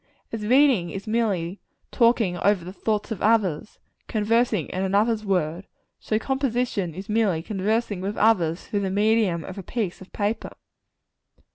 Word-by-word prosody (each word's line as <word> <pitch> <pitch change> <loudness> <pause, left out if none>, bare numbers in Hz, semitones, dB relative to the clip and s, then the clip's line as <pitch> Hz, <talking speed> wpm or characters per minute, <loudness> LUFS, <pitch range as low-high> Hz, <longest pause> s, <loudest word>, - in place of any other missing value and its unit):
As 225 -2 -4
reading 250 -6 +4
is 195 +5 -6
merely 205 -5 -1 0.3
talking 230 -6 +3
over 200 -3 +2
the 185 - -7
thoughts 215 +2 -2
of 215 - -4
others 210 -4 +1 0.3
conversing 220 -4 +1
in 185 - -3
another's 210 +3 +1
words 180 -2 -1 0.3
so 215 - -1
composition 245 - -1
is 195 +2 -7
merely 210 -7 +1
conversing 210 +1 -1
with 200 +3 -3
others 180 -6 +2
through 205 - -2
the 195 -1 -1
medium 205 -4 +2
of 185 +1 -8
a - - -4
piece 195 -2 -3
of 190 - -13
paper. 210 +2 -2
205 Hz, 150 wpm, -24 LUFS, 185-225 Hz, 0.3 s, reading